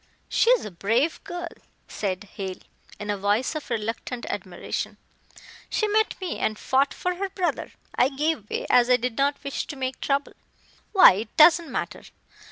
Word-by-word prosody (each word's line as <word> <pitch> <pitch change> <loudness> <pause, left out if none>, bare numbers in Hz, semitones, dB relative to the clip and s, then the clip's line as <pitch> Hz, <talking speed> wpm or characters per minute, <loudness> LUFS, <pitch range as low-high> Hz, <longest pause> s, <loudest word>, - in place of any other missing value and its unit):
"She 460 - +3
is - - +4
a 210 - -6
brave 225 - 0
girl," 345 -1 -5 0.4
said 190 -1 -3
Hale, 190 -2 -5 0.4
in 210 0 -3
a 205 - -2
voice 205 +8 +1
of 310 -3 -6
reluctant 230 +2 -3
admiration. 185 -3 -5 0.7
"She 430 - 0
met 435 +1 +1
me 370 -3 -4
and 215 0 -1
fought 270 +4 +2
for 360 0 -3
her 395 +1 -2
brother. 370 -2 -2 0.2
I 250 - +3
gave 285 -5 -2
way, - - -3
as 245 0 +4
I 250 - +6
did 250 -1 -3
not 280 +2 +1
wish 280 - -3
to - - -6
make 260 -1 -4
trouble. 280 0 0 0.6
Why, 385 - +8
it 210 +3 -6
doesn't 335 +1 +6
matter. - - -4
260 Hz, 175 wpm, -25 LUFS, 210-330 Hz, 0.7 s, Why